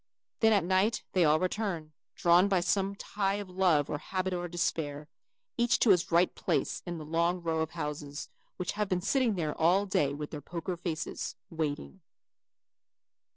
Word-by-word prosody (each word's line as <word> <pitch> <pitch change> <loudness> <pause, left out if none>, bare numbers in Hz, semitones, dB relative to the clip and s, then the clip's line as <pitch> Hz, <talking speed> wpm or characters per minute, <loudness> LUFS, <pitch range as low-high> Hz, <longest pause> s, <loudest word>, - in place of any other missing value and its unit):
Then 225 -1 +5
at 200 -5 +4
night 190 +5 +2
they 185 - +4
all 155 +1 +4
return, 185 -5 -2 0.2
drawn 175 +3 +5
by 195 -2 +3
some 195 +2 0
tie 200 -1 -1
of 205 -2 -6
love 180 -6 +3
or 145 - -3
habit 185 +3 -2
or 175 0 -2
despair, 155 -4 -2 0.5
each 240 0 +3
to 225 - +5
his 180 -2 +2
right 170 +2 +4
place - - -1
in 175 -1 -3
the 155 - -7
long 170 +3 +1
row 165 -2 -1
of 160 - -1
houses, 150 -3 -5 0.3
which 180 - -2
have 210 -1 -2
been 180 -2 0
sitting 235 +2 +2
there 155 -4 -1
all 180 +5 +3
day 150 -8 +1
with 150 0 -6
their 150 - -6
poker 175 +4 -4
faces, 170 -2 -4 0.2
waiting. 145 - -3
175 Hz, 175 wpm, -30 LUFS, 155-190 Hz, 0.5 s, Then